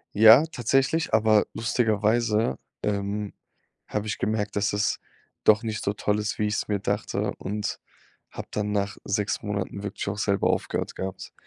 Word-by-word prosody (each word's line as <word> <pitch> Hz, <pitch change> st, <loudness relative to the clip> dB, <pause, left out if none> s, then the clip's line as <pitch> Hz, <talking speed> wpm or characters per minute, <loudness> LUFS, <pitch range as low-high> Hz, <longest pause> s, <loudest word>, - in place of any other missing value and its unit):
Ja, 110 Hz, +8 st, +8 dB
tatsächlich, 135 Hz, +3 st, +1 dB
aber 110 Hz, -1 st, +4 dB
lustigerweise, 110 Hz, -, +1 dB, 0.2 s
ähm, 100 Hz, 0 st, -2 dB, 0.5 s
habe 105 Hz, 0 st, -2 dB
ich 110 Hz, -, -3 dB
gemerkt, 105 Hz, -1 st, -1 dB
dass 100 Hz, 0 st, +1 dB
es 100 Hz, 0 st, 0 dB, 0.4 s
doch 110 Hz, +2 st, +5 dB
nicht 110 Hz, -1 st, -3 dB
so 100 Hz, -, 0 dB
toll 105 Hz, 0 st, 0 dB
ist, 105 Hz, 0 st, -2 dB
wie 105 Hz, -, +1 dB
ich's 105 Hz, 0 st, -1 dB
mir 105 Hz, -1 st, +1 dB
dachte -, -, -1 dB
und 105 Hz, +2 st, -3 dB, 0.5 s
habe -, -, -8 dB
dann 105 Hz, 0 st, -2 dB
nach 100 Hz, 0 st, -1 dB
6 105 Hz, +1 st, -1 dB
Monaten 100 Hz, -1 st, -3 dB
wirklich 100 Hz, 0 st, -5 dB
auch 105 Hz, -, -4 dB
selber 100 Hz, -1 st, +2 dB
aufgehört -, -, -2 dB
gehabt. 95 Hz, 0 st, -6 dB
105 Hz, 155 wpm, -26 LUFS, 100-110 Hz, 0.5 s, Ja